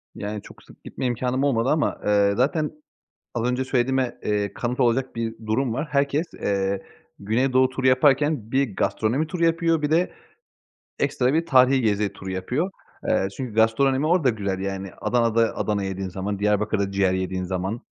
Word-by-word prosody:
Yani 105 0 -5
çok - - -15
sık - - -19
gitme - - -5
imkânım 125 +2 0
olmadı 130 -3 +2
ama, 150 -1 +1
eee, 100 -1 +3
zaten 150 +4 +1 0.6
az 115 - -1
önce 125 +1 -1
söylediğime, 130 0 0
eee, 105 -1 -1
kanıt 125 +2 -3
olacak 125 +1 +1
bir 115 -1 -2
durum 115 +2 0
var. 150 +4 -3
Herkes, 140 +3 +1
eee, 100 -1 -1 0.4
güneydoğu 130 +5 +2
turu 130 0 -2
yaparken 135 -2 +3
bir 130 -6 +1
gastronomi 125 +8 0
turu 170 0 -1
yapıyor, 165 -1 +2
bir 150 - 0
de 170 +3 +2 0.9
ekstra 135 -1 +1
bir 165 +1 +1
tarihî 130 0 +5
gezi 105 -2 +1
turu 95 -1 -8
yapıyor. 125 - -2 0.4
Eee, 95 - +2
çünkü 125 -5 -5
gastronomi 130 +6 +3
orada 165 -5 +3
güzel, 100 -4 -3
yani. 95 0 -4
Adana'da 115 +1 +1
Adana 105 -1 -1
kebap - - -2
yediğin 95 0 -4
zaman, 95 +2 -4
Diyarbakır'da 105 -1 +1
ciğer 95 -1 +2
yediğin 95 0 -2
zaman. 95 +5 -3
120 Hz, 165 wpm, -24 LUFS, 100-135 Hz, 0.9 s, tarihî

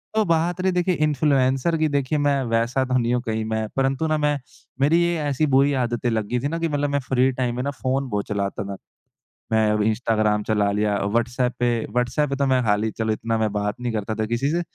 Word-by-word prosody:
तो 220 - +4
बात 170 +1 +1
रही 190 0 +2
देखिए 180 0 +1
इन्फ्लुएंसर 140 0 +2
की 155 0 +2
देखिए 140 +1 0
मैं 145 -1 +2
वैसा 115 +3 +1
तो 130 0 +1
नहीं 120 -1 +1
हूँ 125 - +1
कहीं 110 -1 -1
मैं 110 0 -2
परंतु 135 +3 0
ना 155 0 +1
मैं 150 -1 +1 0.4
मेरी 160 +5 +4
ये 170 0 +1
ऐसी 145 0 0
बुरी 140 +1 +3
आदतें 120 0 -1
लग 110 -2 -1
गई 125 - -1
थी 135 - -2
ना 165 +3 -2
कि 165 - 0
मतलब 145 -1 0
मैं 140 0 +1
फ्री 130 0 +3
टाइम 125 -2 -2
में 125 - -2
ना 140 - -1
फ़ोन 135 0 -2
बहुत 105 -3 -2
चलाता 100 -1 -2
था। 100 - -4 0.8
मैं 110 -1 +3
अब 105 0 +1
इंस्टाग्राम 110 -1 +1
चला 105 -2 +1
लिया 105 0 0
व्हाट्सएप 120 +3 0
पे 120 0 +2 0.2
व्हाट्सएप 125 +5 0
पे 140 - -1
तो 140 0 0
मैं 130 -1 +3
हाली 110 -1 +1
चलो 110 0 -1
इतना 115 +1 -2
मैं 110 -1 0
बात 105 0 -1
नहीं 120 -2 -2
करता 110 0 -2
था 110 0 -1
किसी 120 +5 -1
से, 170 +2 0
125 Hz, 235 wpm, -23 LUFS, 110-145 Hz, 0.8 s, तो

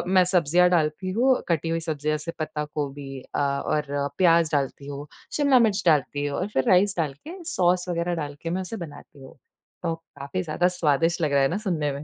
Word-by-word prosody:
मैं 185 - +7
सब्जियाँ 180 0 +3
डालती 170 +2 +1
हूँ, 250 +5 +3
कटी 165 0 0
हुई 165 0 0
सब्जियाँ 155 -2 -2
जैसे 150 +3 -6
पत्ता 155 -1 -3
गोभी 140 -2 -4 0.2
अ, - - +1
और 140 +1 0 0.3
प्याज 170 -3 +4
डालती 140 -1 -1
हूँ, 145 +1 -6 0.3
शिमला 280 -4 +5
मिर्च 215 -4 +2
डालती 145 -3 +2
हूँ 145 -1 -2
और 185 - -1
फिर 130 - +1
राइस 190 +2 +4
डाल 155 -5 0
के 355 +1 -8
सॉस 180 0 +2
वगैरह 175 0 -1
डाल 145 0 -7
के 165 - -2
मैं 185 +2 -1
उसे 205 +5 -6
बनाती 145 -1 -14
हूँ। 130 - -14 0.5
तो 165 -1 0
काफ़ी 150 +1 -6
ज़्यादा 175 +2 +1
स्वादिष्ट 165 +3 +2
लग 150 -2 +1
रहा 140 - +4
है 135 - +4
ना 180 - -1
सुनने 170 -9 -1
में। 140 +1 -6
165 Hz, 210 wpm, -25 LUFS, 145-180 Hz, 0.5 s, मैं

